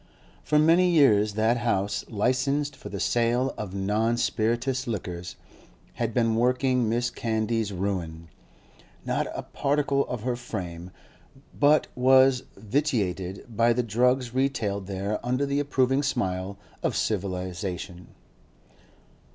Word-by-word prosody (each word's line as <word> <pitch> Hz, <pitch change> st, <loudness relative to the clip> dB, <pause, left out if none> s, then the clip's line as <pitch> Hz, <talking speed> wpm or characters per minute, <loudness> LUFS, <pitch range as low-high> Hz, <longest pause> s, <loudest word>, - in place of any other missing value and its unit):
For 150 Hz, -, +2 dB
many 165 Hz, +4 st, +5 dB
years 110 Hz, -11 st, +4 dB
that 110 Hz, +3 st, +2 dB
house, 100 Hz, -4 st, -1 dB
licensed 130 Hz, +6 st, 0 dB
for -, -, -10 dB
the -, -, -5 dB
sale 120 Hz, +2 st, +1 dB
of 100 Hz, -3 st, -6 dB
non 105 Hz, +4 st, 0 dB
spirituous 120 Hz, +3 st, 0 dB
liquors, 90 Hz, -5 st, -5 dB, 0.6 s
had 115 Hz, -1 st, -2 dB
been 115 Hz, -1 st, +1 dB
working 125 Hz, 0 st, +2 dB
Mrs. 120 Hz, +1 st, 0 dB
Candy's 110 Hz, -1 st, -1 dB
ruin; 90 Hz, -4 st, -3 dB, 0.8 s
not -, -, -1 dB
a -, -, -4 dB
particle 140 Hz, -1 st, 0 dB
of 120 Hz, -4 st, -5 dB
her 125 Hz, 0 st, -1 dB
frame 90 Hz, -7 st, -6 dB, 0.6 s
but 150 Hz, +1 st, +4 dB
was 130 Hz, 0 st, +5 dB, 0.2 s
vitiated 100 Hz, -, -1 dB
by 115 Hz, +1 st, +2 dB
the 125 Hz, +1 st, 0 dB
drugs 125 Hz, +2 st, +1 dB
retailed 110 Hz, -8 st, -1 dB
there 100 Hz, +2 st, -3 dB
under 125 Hz, +3 st, 0 dB
the 140 Hz, 0 st, 0 dB
approving 135 Hz, -1 st, +1 dB
smile 95 Hz, -7 st, -2 dB, 0.2 s
of -, -, -1 dB
civilisation. 90 Hz, -2 st, -3 dB
115 Hz, 120 wpm, -26 LUFS, 100-130 Hz, 0.8 s, many